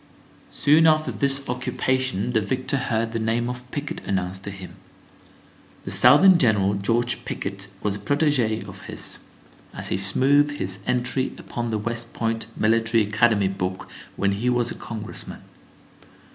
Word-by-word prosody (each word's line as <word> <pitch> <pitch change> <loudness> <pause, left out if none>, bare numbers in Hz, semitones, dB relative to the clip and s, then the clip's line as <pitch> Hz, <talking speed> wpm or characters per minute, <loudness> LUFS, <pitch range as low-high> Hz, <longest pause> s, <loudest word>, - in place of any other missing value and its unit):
Soon 155 +3 +4
after 155 0 +3
this 140 -1 0
occupation 125 -2 -1
the 110 - +3
victor 130 +6 -1
heard 115 -3 -1
the 115 - -1
name 115 +2 0
of 125 0 -6
Pickett 145 +1 -5
announced 95 0 -2
to - - -3
him. 95 -2 -10 1.1
The - - -6
Southern 190 -2 +7
general, 105 -6 +3
George 120 +5 0
Pickett, 100 -3 -5 0.2
was 105 - 0
a - - -7
protégé 130 -2 +1
of - - -10
his, - - -3 0.6
as - - -4
he - - 0
smoothed 140 +10 +3
his 95 -8 -3
entry 125 +1 0
upon 120 -1 -5
the 110 - -1
West 115 +2 -4
Point 115 -1 -2
Military 115 +1 +2
Academy 105 -1 +2
book 95 -1 -4 0.3
when 100 0 +1
he 110 +5 0
was 120 -1 +1
a - - -3
congressman. 110 -2 -7
115 Hz, 150 wpm, -24 LUFS, 100-130 Hz, 1.1 s, Southern